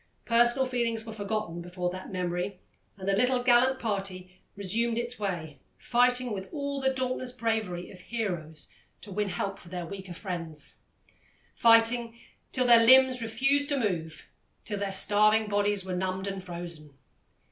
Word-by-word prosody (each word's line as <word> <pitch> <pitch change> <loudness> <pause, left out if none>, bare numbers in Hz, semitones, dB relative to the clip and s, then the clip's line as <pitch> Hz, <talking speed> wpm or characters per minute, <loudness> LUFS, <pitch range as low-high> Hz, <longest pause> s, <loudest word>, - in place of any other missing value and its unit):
Personal 240 +3 +4
feelings 235 -3 -1
were 220 - -7
forgotten 205 -5 -3
before 180 0 -3
that 185 +2 -8
memory, 180 +1 -3 0.4
and 190 -1 -7
the 195 - +3
gallant 250 +4 +2
little 250 +2 +5
party 195 -6 -3 0.2
resumed 225 +4 0
its 240 0 -3
way, 170 -7 -4 0.2
fighting 250 -1 +2
with 190 -1 -6
all 280 -2 -3
the 265 - +3
dauntless 255 -1 -2
bravery 220 -7 -2
of 185 - -13
heroes 175 -8 -4 0.3
to 205 - -8
win 205 +1 -1
help 195 +2 -3
for 175 - -15
their 175 -1 -5
weaker 190 -1 -8
friends 170 -5 -6 0.8
fighting 230 0 +4 0.3
till 255 -1 +1
their 235 -1 +7
limbs 260 +1 +6
refused 270 +6 +1
to 285 - +1
move, 170 - -3 0.4
till 205 -2 -1
their 200 -1 -2
starving 215 +2 +4
bodies 205 -1 0
were 185 -1 -3
numbed 185 +1 -2
and 195 -1 -4
frozen. 170 -5 -9
205 Hz, 155 wpm, -28 LUFS, 185-240 Hz, 0.8 s, their